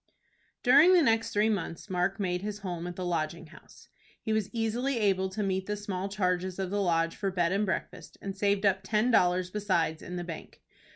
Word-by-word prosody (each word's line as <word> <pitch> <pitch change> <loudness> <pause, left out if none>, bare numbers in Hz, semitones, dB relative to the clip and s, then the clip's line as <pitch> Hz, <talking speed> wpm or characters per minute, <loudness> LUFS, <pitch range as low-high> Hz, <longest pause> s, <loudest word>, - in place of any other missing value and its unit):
During 285 +9 +7
the 345 - +5
next 225 -2 +2
three 210 0 +2
months 190 -5 -3
Mark 185 +1 -1
made 180 -2 -1
his 210 +1 -5
home 175 -3 -4
at 175 - -6
the 185 - -4
Lodging 170 -1 -2
House. 155 - -17 0.3
He 220 - -2
was 215 -2 0
easily 235 +4 -1
able 190 -3 +1
to 205 +3 -3
meet 190 -1 -1
the 210 0 -2
small 195 -2 -4
charges 185 -2 -1
of 190 -1 -3
the 205 0 0
Lodge 165 -2 +1
for 195 - -2
bed 175 -2 0
and 200 +2 +1
breakfast, 190 - -4
and 195 -1 -6
saved 200 0 +1
up 190 -1 +3
ten 215 +5 +1
dollars 180 -3 +3
besides 185 -6 0
in 180 - -7
the 175 - -3
bank. 165 -2 -9
195 Hz, 210 wpm, -29 LUFS, 180-210 Hz, 0.3 s, During